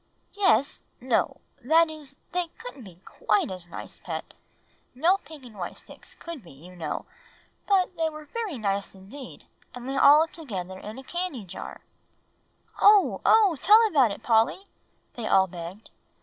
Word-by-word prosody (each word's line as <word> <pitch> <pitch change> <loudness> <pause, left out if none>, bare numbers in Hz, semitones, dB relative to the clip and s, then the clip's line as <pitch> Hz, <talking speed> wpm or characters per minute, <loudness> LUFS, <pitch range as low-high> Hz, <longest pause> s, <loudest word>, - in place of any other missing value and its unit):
"Yes 385 -8 +2 0.2
no; 245 -1 0 0.2
that 325 +6 +5
is, 300 -3 -9 0.2
they 360 -1 -1
couldn't 455 - -10
be 180 -3 -14
quite 210 -2 0
as 180 -2 -6
nice, - - -9
Pet. - - -6 0.6
No 340 +9 +3
pink 315 -7 -14
and 235 -4 -13
white 175 - -5
sticks - - -13
could 335 -5 -8
be, 175 - -16
you 170 +7 -14
know. 160 -4 -4 0.6
But 370 -2 +2
they 325 -1 +1
were 305 -1 -10
very 410 - -4
nice 200 -2 -2
indeed, 215 +9 -11 0.3
and 245 0 -8
they 270 +1 -2
all 290 +2 +8
lived 325 - -1
together 190 - -6
in 210 +4 -8
a 265 - -9
candy 345 - -4
jar." 185 +1 -8 1.0
"Oh 410 -1 +6
oh! 410 -8 +5
Tell 435 +3 +7
about 280 - +4
it, 200 - -7
Polly," 230 - +2 0.5
they 230 -3 -5
all 190 - +5
begged. 180 +3 -9
270 Hz, 165 wpm, -26 LUFS, -, 1.0 s, all